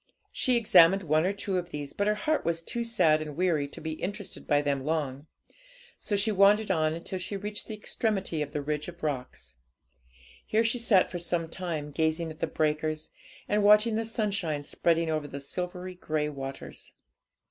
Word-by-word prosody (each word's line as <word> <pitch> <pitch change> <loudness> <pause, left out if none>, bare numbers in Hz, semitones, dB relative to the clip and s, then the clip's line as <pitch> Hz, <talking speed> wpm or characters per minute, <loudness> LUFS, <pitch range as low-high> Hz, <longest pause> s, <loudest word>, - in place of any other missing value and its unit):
She 255 -2 +2
examined 195 -4 +6
one 155 +1 +2
or - - +2
two 200 -2 -1
of 175 0 -7
these, 145 -3 -6
but 205 - 0
her 210 - +3
heart 305 +9 0
was 165 0 -1
too 235 +7 -3
sad 160 -10 +3
and 150 -1 -6
weary 170 -6 +1
to 140 - -10
be 160 - -4
interested 205 +1 -5
by 145 0 +3
them 140 -2 0
long, 145 -2 -2 0.7
so 205 - -2
she 205 +2 +2
wandered 205 +1 +4
on 155 -3 +1
until 175 +3 -5
she 185 +3 -4
reached 210 +1 -5
the 220 - -5
extremity 205 -6 -1
of 145 -1 -3
the 150 -1 -3
ridge 150 +1 -2
of 175 -1 -10
rocks. 125 - -4 0.9
Here 220 +1 +2
she 235 +2 +1
sat 210 -5 +3
for 175 - -4
some 170 -1 -1
time, 160 -5 -4
gazing 160 +2 0
at 155 - -12
the 165 - 0
breakers, 155 0 -1 0.4
and 210 0 +2
watching 210 +2 +5
the 225 - 0
sunshine 200 -9 -2
spreading 165 +2 +1
over 155 -2 -1
the 140 0 -7
silvery 180 +5 -5
grey 155 -4 -2
waters. 135 -1 -8
170 Hz, 190 wpm, -28 LUFS, 150-205 Hz, 0.9 s, examined